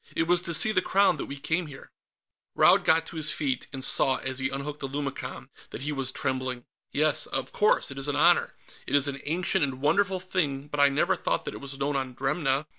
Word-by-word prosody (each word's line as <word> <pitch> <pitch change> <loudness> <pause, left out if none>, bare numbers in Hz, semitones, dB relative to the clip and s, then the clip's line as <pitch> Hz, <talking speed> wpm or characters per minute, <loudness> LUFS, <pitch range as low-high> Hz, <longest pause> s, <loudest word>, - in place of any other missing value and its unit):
It - - +2
was 175 0 +3
to 170 - -2
see 220 - +5
the 185 -3 +2
Crown 195 -3 +2
that - - -5
we 140 - -6
came 160 +4 -2
here." 135 -2 -13 0.6
Raud - - +5
got 165 +1 +3
to 165 - -9
his 155 -1 +3
feet, 135 -5 -2
and 135 -2 -4
saw, 135 0 +5
as 130 0 -3
he 130 +1 0
unhooked 140 +2 -5
the 135 - -4
lumicon, 140 0 -6 0.2
that 130 - -8
he 150 - -2
was 135 -3 -3
trembling. 130 -2 -3 0.3
"Yes, 150 0 +1
of 135 - -4
course. 210 -8 +1
It 135 - -7
is 135 - +1
an 145 - -1
honor. - - +3 0.3
It - - 0
is 145 0 +3
an 140 -1 -5
ancient 175 +2 0
and 135 -2 -2
wonderful 185 +7 +1
thing, 150 -7 -3
but 145 - -4
I 140 0 +6
never 140 - +1
thought - - -2
that - - -5
it - - -9
was 140 0 -6
known 140 +1 -2
on 130 -2 -3
Dremna." 135 +1 -1
140 Hz, 235 wpm, -26 LUFS, 135-160 Hz, 0.6 s, I